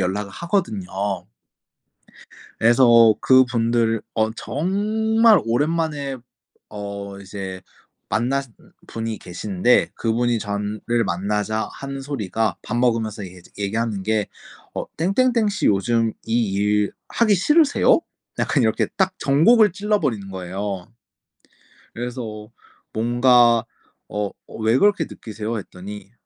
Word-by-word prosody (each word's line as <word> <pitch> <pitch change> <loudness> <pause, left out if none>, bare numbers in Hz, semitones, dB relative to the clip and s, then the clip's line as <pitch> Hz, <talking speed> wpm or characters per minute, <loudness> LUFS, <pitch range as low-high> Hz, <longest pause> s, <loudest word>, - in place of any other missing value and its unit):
연락을 100 +2 -2
하거든요. 100 - -2 1.3
그래서 115 -1 +6
그분들 115 -3 +3
어 110 0 +1
정말 215 - +2
오랜만에 145 +2 -1 0.5
어 100 -1 -7
이제 95 -1 -7 0.5
만나신 125 +2 -1
음 - - -21 0.2
분이 115 -1 -4
계시는데 95 +5 +1
그분이 120 +1 0
전을 105 +1 -4 0.3
만나자 105 +4 -1
하는 140 0 -6
소리가 110 -7 -2
밥 120 - -4
먹으면서 115 -4 0
얘기하지 90 -1 -13
얘기하는 105 0 -2
게 110 0 0 0.5
어 - - -2
"땡땡땡 220 - +2
씨 190 -5 -1
요즘 110 +3 +2
이 115 -2 +1
일 105 +1 +1 0.2
하기 220 -3 +3
싫으세요?" 300 - +4 0.4
약간 140 - +1
이렇게 110 - +1
딱 190 -1 +1
정곡을 205 - +5
찔러버리는 165 - -1
거예요. 95 +1 -5 1.1
그래서 115 -3 -6 0.4
뭔가 120 0 +4 0.5
어 105 -1 -2 0.2
어 - - -12
"왜 110 +3 +3
그렇게 205 -4 +3
느끼세요?" 110 +1 -6
했더니 100 +1 -9
115 Hz, 250 characters per minute, -22 LUFS, 105-140 Hz, 1.3 s, 그래서